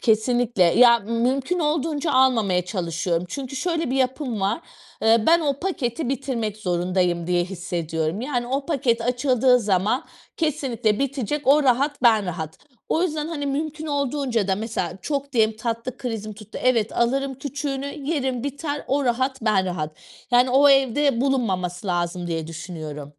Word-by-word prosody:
kesinlikle, 235 Hz, -1 st, +2 dB
ya 235 Hz, +7 st, +6 dB
mümkün 250 Hz, -, -1 dB
olduğunca 305 Hz, -1 st, 0 dB
almamaya 225 Hz, -9 st, +3 dB
çalışıyorum 175 Hz, -2 st, -2 dB
çünkü 270 Hz, +4 st, -6 dB
şöyle 330 Hz, -1 st, -1 dB
bir 265 Hz, -, 0 dB
yapım 260 Hz, -3 st, -1 dB
var, 195 Hz, +10 st, 0 dB, 0.4 s
ııı, 225 Hz, 0 st, +4 dB
ben 340 Hz, +1 st, +6 dB
o 280 Hz, -3 st, -1 dB
paketi 305 Hz, -7 st, -2 dB
bitirmek 250 Hz, -6 st, -2 dB
zorundayım 180 Hz, -2 st, 0 dB
diye 175 Hz, 0 st, +1 dB
hissediyorum, 170 Hz, -1 st, -3 dB
yani 245 Hz, -2 st, -2 dB
o 270 Hz, +3 st, -2 dB
paket 250 Hz, -7 st, +1 dB
açıldığı 250 Hz, +1 st, +3 dB
zaman 205 Hz, +4 st, +1 dB, 0.3 s
kesinlikle 255 Hz, -9 st, 0 dB
bitecek 275 Hz, +1 st, -2 dB
o 290 Hz, +3 st, +6 dB
rahat, 275 Hz, +2 st, +1 dB
ben 220 Hz, -5 st, +5 dB
rahat. 160 Hz, -3 st, -5 dB, 0.3 s
O 325 Hz, -, +1 dB
yüzden, 310 Hz, -3 st, -1 dB
hani, 295 Hz, -4 st, -3 dB
mümkün 305 Hz, +2 st, -3 dB
olduğunca 275 Hz, -7 st, -1 dB
da 190 Hz, -, +3 dB
mesela, 210 Hz, -4 st, -3 dB
çok 280 Hz, -1 st, -3 dB
diyelim, 220 Hz, -3 st, +2 dB
tatlı 230 Hz, +2 st, -4 dB
krizim 220 Hz, -4 st, -4 dB
tuttu, 215 Hz, +1 st, -9 dB
evet 230 Hz, -4 st, +2 dB
alırım 270 Hz, +3 st, 0 dB
küçüğünü, 280 Hz, 0 st, -4 dB, 0.2 s
yerim 265 Hz, -5 st, -1 dB
biter, 285 Hz, +1 st, -4 dB
o 280 Hz, +1 st, +1 dB
rahat, 260 Hz, +1 st, 0 dB
ben 210 Hz, -4 st, +2 dB
rahat. 155 Hz, -4 st, -3 dB, 0.4 s
Yani 245 Hz, +1 st, +4 dB
o, 275 Hz, +3 st, +6 dB
evde 275 Hz, -1 st, +3 dB
bulunmaması 200 Hz, -9 st, -1 dB
lazım 175 Hz, 0 st, -1 dB
diye 165 Hz, -2 st, -3 dB
düşünüyorum. 160 Hz, -3 st, -7 dB
245 Hz, 150 wpm, -23 LUFS, 195-275 Hz, 0.4 s, ya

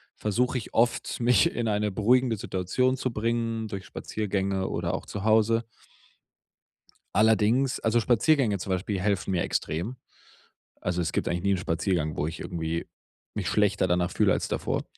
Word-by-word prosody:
versuche 125 Hz, +5 st, 0 dB
ich 115 Hz, -, -7 dB
oft, 120 Hz, +2 st, +1 dB
mich 125 Hz, +8 st, +4 dB
in 120 Hz, -1 st, -1 dB
eine 105 Hz, -1 st, 0 dB
beruhigende 115 Hz, +3 st, +2 dB
Situation 125 Hz, +9 st, 0 dB
zu 130 Hz, -2 st, -2 dB
bringen, 115 Hz, 0 st, -1 dB
durch 95 Hz, -2 st, -6 dB
Spaziergänge 95 Hz, -2 st, -2 dB
oder 85 Hz, +2 st, -2 dB
auch -, -, -6 dB
zu 100 Hz, +1 st, -6 dB
Hause. 110 Hz, +1 st, +3 dB, 1.5 s
Allerdings 110 Hz, +5 st, +3 dB
also 115 Hz, +1 st, +2 dB
Spaziergänge 120 Hz, -1 st, +3 dB
zum 95 Hz, -, -4 dB
Beispiel 95 Hz, +2 st, -1 dB
helfen 100 Hz, -1 st, 0 dB
mir 90 Hz, -2 st, +1 dB
extrem. 90 Hz, +11 st, -2 dB, 0.9 s
Also, 90 Hz, 0 st, -1 dB
es 80 Hz, 0 st, -1 dB
gibt -, -, -1 dB
eigentlich 85 Hz, +1 st, -1 dB
nie 100 Hz, 0 st, +3 dB
'n -, -, 0 dB
Spaziergang, 80 Hz, -2 st, -1 dB
wo 75 Hz, -, 0 dB
ich 80 Hz, -, -6 dB
irgendwie 85 Hz, -1 st, -3 dB, 0.5 s
mich -, -, -2 dB
schlechter 105 Hz, -2 st, +2 dB
danach 90 Hz, 0 st, +1 dB
fühle -, -, +3 dB
als -, -, -1 dB
davor. -, -, -2 dB
105 Hz, 160 wpm, -27 LUFS, 90-115 Hz, 1.5 s, mich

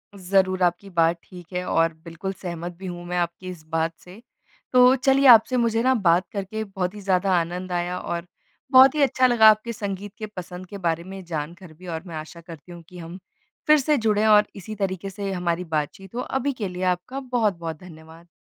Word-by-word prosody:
ज़रूर, 190 Hz, 0 st, +1 dB
आपकी 175 Hz, +3 st, 0 dB
बात 170 Hz, -1 st, +2 dB
ठीक 180 Hz, 0 st, -14 dB
है 180 Hz, -, -2 dB
और 165 Hz, -2 st, +1 dB
बिल्कुल 170 Hz, +4 st, -5 dB
सहमत 175 Hz, -1 st, -6 dB
भी 190 Hz, -, -10 dB
हूँ 175 Hz, -1 st, -6 dB
मैं 180 Hz, 0 st, -3 dB
आपकी 175 Hz, +1 st, -3 dB
इस 175 Hz, -4 st, -9 dB
बात 165 Hz, 0 st, -1 dB
से। 185 Hz, +5 st, -14 dB, 0.5 s
तो 250 Hz, +1 st, +7 dB
चलिए 270 Hz, +1 st, +3 dB
आपसे 245 Hz, +1 st, +7 dB
मुझे 230 Hz, -1 st, +1 dB
ना 260 Hz, 0 st, +4 dB
बात 180 Hz, -3 st, +2 dB
करके 205 Hz, +2 st, -4 dB
बहुत 190 Hz, -2 st, -4 dB
ही 205 Hz, -, -8 dB
ज़्यादा 190 Hz, 0 st, +1 dB
आनंद 180 Hz, +2 st, -4 dB
आया। 175 Hz, +1 st, -2 dB
और 170 Hz, 0 st, -4 dB, 0.5 s
बहुत 260 Hz, +2 st, +8 dB
ही 300 Hz, -, +1 dB
अच्छा 260 Hz, -2 st, +3 dB
लगा 225 Hz, -3 st, +7 dB
आपके 215 Hz, +2 st, +1 dB
संगीत 200 Hz, -1 st, -5 dB
के 215 Hz, -, -5 dB
पसंद 180 Hz, 0 st, -8 dB
के 200 Hz, -, -8 dB
बारे 170 Hz, -3 st, -1 dB
में 190 Hz, 0 st, -9 dB
जानकर 165 Hz, +1 st, -6 dB
भी। 180 Hz, +3 st, -14 dB
और 165 Hz, 0 st, -5 dB
मैं 165 Hz, -, -7 dB
आशा 155 Hz, +2 st, -8 dB
करती 165 Hz, 0 st, -12 dB
हूँ 170 Hz, -1 st, -10 dB
कि 180 Hz, -, -12 dB
हम 170 Hz, +2 st, -9 dB, 0.5 s
फिर 305 Hz, -, +7 dB
से 295 Hz, +2 st, +2 dB
जुड़े 215 Hz, -2 st, +1 dB
और 210 Hz, -1 st, +5 dB
इसी 200 Hz, +3 st, -8 dB
तरीके 195 Hz, -1 st, -3 dB
से 195 Hz, 0 st, -5 dB
हमारी 175 Hz, -1 st, -1 dB
बातचीत 180 Hz, +7 st, -4 dB
हो। 245 Hz, -, -2 dB
अभी 265 Hz, +1 st, -2 dB
के 215 Hz, -5 st, -4 dB
लिए 180 Hz, 0 st, -6 dB
आपका 180 Hz, +9 st, -1 dB
बहुत-बहुत 210 Hz, -, -2 dB
धन्यवाद। 165 Hz, -1 st, -14 dB
185 Hz, 210 wpm, -24 LUFS, 175-215 Hz, 0.5 s, बहुत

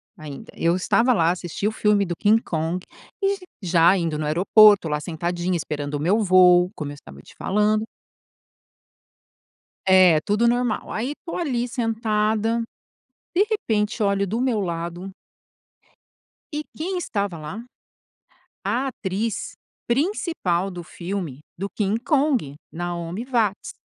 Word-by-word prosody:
ainda. 150 Hz, -6 st, -9 dB
Eu 170 Hz, +1 st, +2 dB
estava 230 Hz, +7 st, +2 dB
lá, 170 Hz, -8 st, +3 dB
assisti 180 Hz, +2 st, -3 dB
o -, -, 0 dB
filme 210 Hz, -2 st, +2 dB
do 175 Hz, -1 st, -3 dB
King 215 Hz, +5 st, +4 dB
Kong 165 Hz, +1 st, -3 dB, 0.3 s
e 395 Hz, 0 st, +1 dB
j -, -, -20 dB, 0.2 s
já 175 Hz, +1 st, +4 dB
indo 165 Hz, -3 st, -1 dB
no 155 Hz, -, -2 dB
aeroporto, 200 Hz, +4 st, +6 dB
lá 150 Hz, -1 st, -1 dB
sentadinha, 175 Hz, +3 st, -2 dB
esperando 145 Hz, -2 st, -4 dB
o -, -, -2 dB
meu 180 Hz, +9 st, +2 dB
voo, 180 Hz, -3 st, +5 dB
como 150 Hz, -4 st, -5 dB
eu -, -, -7 dB
estava 70 Hz, -, -13 dB
te -, -, -17 dB
falando 210 Hz, +2 st, +1 dB, 2.0 s
É, 185 Hz, -4 st, +6 dB
tudo 210 Hz, +8 st, +1 dB
normal, 240 Hz, -1 st, 0 dB
aí 250 Hz, +6 st, -2 dB
tô 335 Hz, -, -5 dB
ali 255 Hz, -8 st, -1 dB
sentada, 225 Hz, -1 st, 0 dB, 0.7 s
de 380 Hz, +4 st, +4 dB
repente 220 Hz, -, -1 dB
olho 200 Hz, -1 st, +1 dB
do 220 Hz, +5 st, -2 dB
meu 250 Hz, -4 st, +1 dB
lado 175 Hz, +1 st, -4 dB, 1.4 s
e 300 Hz, +1 st, -2 dB
quem 360 Hz, +4 st, -3 dB
estava 200 Hz, -, -2 dB
lá? 155 Hz, +9 st, -7 dB, 1.0 s
A 240 Hz, +7 st, 0 dB
atriz 215 Hz, -2 st, -3 dB, 0.3 s
principal 235 Hz, -, 0 dB
do 175 Hz, -2 st, -7 dB
filme 175 Hz, -6 st, -5 dB, 0.2 s
do 195 Hz, +2 st, -3 dB
King 205 Hz, +1 st, -1 dB
Kong, 270 Hz, -, +1 dB, 0.2 s
Naomi 175 Hz, +4 st, -4 dB
Watts. 230 Hz, -6 st, -1 dB
200 Hz, 135 wpm, -23 LUFS, 170-230 Hz, 2.0 s, aeroporto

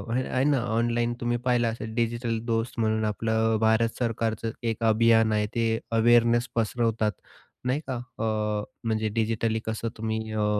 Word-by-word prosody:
हे 130 Hz, -, +1 dB
आहे 130 Hz, -, 0 dB
ना, 145 Hz, -2 st, +3 dB, 0.2 s
ऑनलाईन 120 Hz, +1 st, +1 dB
तुम्ही 120 Hz, 0 st, 0 dB
पाहिलं 120 Hz, -2 st, +2 dB
असेल 110 Hz, -1 st, -4 dB
डिजिटल 115 Hz, -1 st, -1 dB
दोस्त 115 Hz, 0 st, -1 dB
म्हणून 110 Hz, -1 st, +1 dB
आपलं 110 Hz, +1 st, +1 dB
भारत 110 Hz, +1 st, +2 dB
सरकारचं 115 Hz, -1 st, -1 dB, 0.2 s
एक 115 Hz, +1 st, -6 dB
अभियान 115 Hz, 0 st, +4 dB
आहे, 105 Hz, 0 st, +1 dB
ते 115 Hz, -1 st, +1 dB
अवेअरनेस 120 Hz, +1 st, +4 dB
पसरवतात 115 Hz, -1 st, +1 dB, 0.5 s
नाही 130 Hz, +3 st, +1 dB
का? 130 Hz, -, -1 dB
अ, 120 Hz, -2 st, -7 dB, 0.6 s
म्हणजे 110 Hz, -1 st, 0 dB
डिजिटली 110 Hz, 0 st, 0 dB
कसं 110 Hz, +1 st, -3 dB
तुम्ही 110 Hz, 0 st, -3 dB
अ, 105 Hz, -1 st, 0 dB
115 Hz, 155 wpm, -26 LUFS, 110-120 Hz, 0.6 s, अभियान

